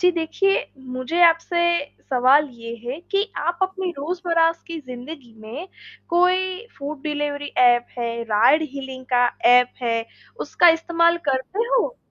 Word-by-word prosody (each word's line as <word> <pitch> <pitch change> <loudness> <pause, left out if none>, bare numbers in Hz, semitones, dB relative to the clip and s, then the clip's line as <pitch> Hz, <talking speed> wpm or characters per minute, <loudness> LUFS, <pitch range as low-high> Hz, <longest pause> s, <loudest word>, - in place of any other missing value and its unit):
जी 360 0 +5
देखिए, 350 +4 +1 0.4
मुझे 255 +7 -2
आपसे 330 +1 +3 0.5
सवाल 265 +4 +4
ये 230 -1 -8
है 255 +5 -4
कि 395 0 +2 0.2
आप 345 +2 -2
अपनी 380 -1 -1
रोज़मर्रा 335 +1 0
की 335 -1 -6
ज़िंदगी 250 0 -9
में 260 - -8 0.4
कोई 370 +4 +1
फूड 280 0 -6
डिलिवरी 290 -1 -3
ऐप 240 -1 +4
है, 235 -1 -3
राइड-हेलिंग 265 +3 +1
का 245 0 +4 0.2
ऐप 250 0 +5
है, 230 -1 0 0.4
उसका 350 - +4
इस्तेमाल 335 0 +2
करते 260 +8 -2
हो? - - 0
300 Hz, 135 wpm, -22 LUFS, 250-345 Hz, 0.5 s, जी